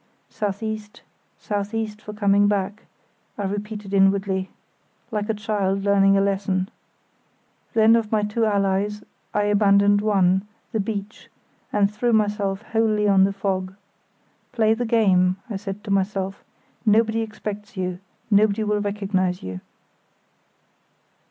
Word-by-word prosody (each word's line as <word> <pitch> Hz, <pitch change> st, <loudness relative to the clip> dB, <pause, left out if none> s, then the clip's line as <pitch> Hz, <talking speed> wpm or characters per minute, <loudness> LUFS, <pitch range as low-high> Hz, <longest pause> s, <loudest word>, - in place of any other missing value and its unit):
("South 205 Hz, 0 st, -3 dB
east—south 210 Hz, -1 st, -6 dB
east 215 Hz, -1 st, -3 dB
for 210 Hz, -, -8 dB
coming 205 Hz, -1 st, +3 dB
back," 205 Hz, +1 st, -2 dB, 0.5 s
I 205 Hz, -, -3 dB
repeated 205 Hz, 0 st, -5 dB
inwardly, 195 Hz, -1 st, +2 dB, 0.6 s
like 210 Hz, -1 st, -2 dB
a -, -, +2 dB
child 200 Hz, -2 st, -1 dB
learning 195 Hz, -1 st, +4 dB
a -, -, +3 dB
lesson.) 195 Hz, -1 st, 0 dB, 1.1 s
Then 225 Hz, 0 st, +6 dB
of 225 Hz, -2 st, -1 dB
my 215 Hz, -1 st, +2 dB
two 210 Hz, +2 st, -1 dB
allies 200 Hz, 0 st, 0 dB, 0.3 s
I 210 Hz, -, +1 dB
abandoned 205 Hz, 0 st, +4 dB
one, 195 Hz, -2 st, +2 dB, 0.2 s
the 220 Hz, -, -1 dB
beach, 205 Hz, 0 st, -5 dB, 0.4 s
and 205 Hz, 0 st, +2 dB
threw 235 Hz, +3 st, 0 dB
myself 205 Hz, -2 st, 0 dB
wholly 220 Hz, -2 st, +1 dB
on 195 Hz, -1 st, +5 dB
the 195 Hz, -, 0 dB
fog. 190 Hz, -1 st, -2 dB, 0.8 s
"Play 220 Hz, -1 st, +3 dB
the 240 Hz, +2 st, -2 dB
game," 185 Hz, -5 st, +3 dB, 0.2 s
I -, -, -2 dB
said 195 Hz, +1 st, -7 dB
to 210 Hz, -, -5 dB
myself. 195 Hz, 0 st, -1 dB, 0.4 s
"Nobody 220 Hz, 0 st, +3 dB
expects 210 Hz, 0 st, -6 dB
you; 180 Hz, -1 st, -3 dB, 0.3 s
nobody 210 Hz, +1 st, +3 dB
will 210 Hz, -1 st, 0 dB
recognise 195 Hz, -3 st, -1 dB
you." 95 Hz, 0 st, -5 dB
205 Hz, 130 wpm, -23 LUFS, 195-215 Hz, 1.1 s, Then